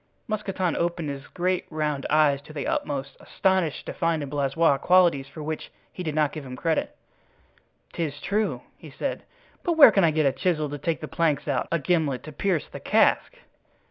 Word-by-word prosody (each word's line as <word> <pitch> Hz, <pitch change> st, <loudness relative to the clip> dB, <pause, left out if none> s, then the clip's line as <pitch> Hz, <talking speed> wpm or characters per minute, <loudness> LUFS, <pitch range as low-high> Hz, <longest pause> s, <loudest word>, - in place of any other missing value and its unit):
Mousqueton 195 Hz, -5 st, -1 dB
opened 170 Hz, -2 st, -1 dB
his 140 Hz, 0 st, -8 dB
great 180 Hz, +1 st, -1 dB
round 150 Hz, -3 st, -2 dB
eyes 145 Hz, -2 st, +3 dB
to 155 Hz, -, -13 dB
the 145 Hz, -, -4 dB
utmost, 140 Hz, -2 st, -2 dB
astonished 185 Hz, -5 st, 0 dB
to -, -, -5 dB
find 165 Hz, -3 st, 0 dB
in 140 Hz, -, -6 dB
Blaisois 145 Hz, +1 st, +2 dB
qualities 175 Hz, -7 st, +4 dB
for 150 Hz, +2 st, -9 dB
which 155 Hz, +1 st, -5 dB, 0.2 s
he -, -, -7 dB
did 155 Hz, -4 st, -3 dB
not 150 Hz, -2 st, +2 dB
give 155 Hz, -, -7 dB
him 130 Hz, -1 st, -8 dB
credit. 160 Hz, +3 st, -1 dB, 1.0 s
"'Tis 150 Hz, -4 st, -3 dB
true," 210 Hz, +2 st, -1 dB, 0.2 s
he -, -, -11 dB
said; -, -, -4 dB, 0.4 s
"but 345 Hz, -, 0 dB
where 315 Hz, -3 st, +9 dB
can 195 Hz, -, +3 dB
I 165 Hz, -, +5 dB
get 155 Hz, -1 st, +1 dB
a 135 Hz, -, +4 dB
chisel 155 Hz, -2 st, -1 dB
to 145 Hz, -, -5 dB
take 165 Hz, +3 st, -2 dB
the 155 Hz, -, -5 dB
planks 155 Hz, -3 st, 0 dB
out, 135 Hz, -3 st, 0 dB
a 170 Hz, -, +2 dB
gimlet 150 Hz, -5 st, 0 dB
to 155 Hz, -, -8 dB
pierce 175 Hz, +1 st, -1 dB
the -, -, -9 dB
cask?" -, -, +2 dB
155 Hz, 195 wpm, -25 LUFS, 145-175 Hz, 1.0 s, where